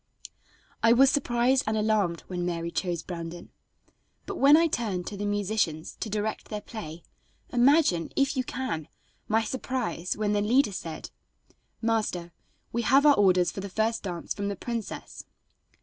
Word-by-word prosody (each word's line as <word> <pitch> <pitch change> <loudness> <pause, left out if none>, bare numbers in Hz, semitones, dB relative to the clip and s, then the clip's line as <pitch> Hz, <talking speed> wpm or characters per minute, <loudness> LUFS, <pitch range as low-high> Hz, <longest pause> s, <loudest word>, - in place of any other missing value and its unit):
I 230 0 +6
was 265 +3 +6
surprised 255 -1 +2
and 220 0 +1
alarmed 210 -6 +1
when 180 -1 -5
Mary 170 -1 -2
chose 175 -3 -2
Brandon, 170 -1 -7 0.7
but - - -5
when 285 +3 +7
I 335 - +4
turned 210 - -2
to 205 - -5
the 205 +1 -3
musicians 205 -6 -1
to 220 - -3
direct 210 +1 -2
their 210 - -3
play, 170 -8 -8 0.5
imagine, 250 - +3
if 275 +1 +2
you 260 - 0
can, 235 - -4 0.4
my 220 +1 +2
surprise 245 -7 -3
when 210 -1 0
the 205 - +2
leader 235 +2 +3
said: 165 -3 -6 0.7
"Master, 215 -7 -1 0.4
we 235 - 0
have 275 +5 +4
our 295 - +8
orders 180 -4 +4
for - - -7
the 200 +1 -5
first 220 +4 0
dance 175 -4 -4
from 200 0 -3
the 200 - -2
princess." 230 +1 -6
210 Hz, 160 wpm, -27 LUFS, 180-240 Hz, 0.7 s, our